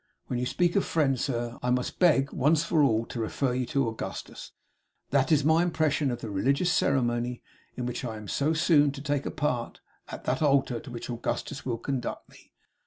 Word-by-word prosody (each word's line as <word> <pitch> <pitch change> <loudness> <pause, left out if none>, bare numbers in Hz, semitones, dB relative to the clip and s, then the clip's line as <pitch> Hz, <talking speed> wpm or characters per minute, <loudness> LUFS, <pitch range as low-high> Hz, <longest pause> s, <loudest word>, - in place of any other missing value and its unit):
When 125 - -3
you 125 - -1
speak 175 +7 +1
of 200 - +3
friends, 135 -6 +1
sir, 120 -3 -3
I 125 - -1
must 125 0 -1
beg, 150 -6 +4
once 150 +3 +3
for 165 -2 +2
all, 115 -5 +3
to 120 - -6
refer 125 +3 -1
you 125 -1 -1
to 135 -1 +1
Augustus. 110 0 -6 0.6
That 135 +2 +2
is 150 -2 +4
my 160 +2 +5
impression 155 -4 +1
of 120 - -4
the 110 - -5
religious 140 - +1
ceremony 120 -2 0 0.3
in 125 - -2
which 125 +2 -4
I 115 -3 -4
am 105 -1 -9
so 145 +9 +1
soon 155 -3 +4
to 140 - -8
take 145 -1 -1
a - - -1
part 125 -6 -2 0.3
at - - -8
that 130 - -1
altar 135 -5 +2
to 140 - -11
which 120 -1 -6
Augustus 120 +3 -4
will 120 -2 -1
conduct 125 +1 -4
me. - - -19
135 Hz, 205 wpm, -28 LUFS, 120-150 Hz, 0.6 s, my